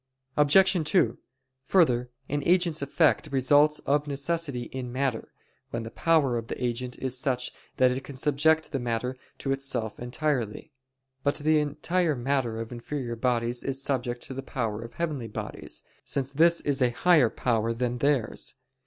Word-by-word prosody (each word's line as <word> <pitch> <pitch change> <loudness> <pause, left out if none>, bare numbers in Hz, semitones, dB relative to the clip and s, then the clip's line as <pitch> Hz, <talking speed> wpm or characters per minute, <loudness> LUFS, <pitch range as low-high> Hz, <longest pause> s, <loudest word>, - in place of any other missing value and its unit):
Obj. 180 +4 +5
2: 145 - +3 0.5
Further, 125 -8 +3 0.2
an 145 +1 -1
agent's 175 -2 +2
effect 150 +2 +2
results 145 +3 +4
of 145 +1 +1
necessity 140 -2 -1
in 125 0 -6
matter, 130 -2 -2 0.4
when 115 0 -3
the 115 - -7
power 145 -7 +2
of 115 - -8
the - - -4
agent 125 +1 -2
is 130 -1 -3
such 130 -3 -1 0.3
that 130 -1 +5
it 130 +1 -3
can 140 -1 -9
subject 155 +3 +2
the 135 - -1
matter 120 +1 -2 0.2
to 135 - -3
itself 135 -5 -2
entirely. 125 0 -2 0.5
But 140 +1 +1
the 155 +1 +3
entire 150 +3 0
matter 125 -2 -1
of 115 +1 -6
inferior 120 0 -4
bodies 120 0 0
is 135 0 -2
subject 125 -3 -2
to - - -6
the 135 - -4
power 115 -5 -3
of 115 0 -10
heavenly 150 -8 -2
bodies, 105 - -6 0.2
since 135 0 -2
this 170 +3 +4
is 140 -2 -1
a 125 - +4
higher 150 0 +4
power 115 -2 0
than 120 +1 -2
theirs. 140 -5 +1
135 Hz, 160 wpm, -27 LUFS, 120-150 Hz, 0.5 s, Obj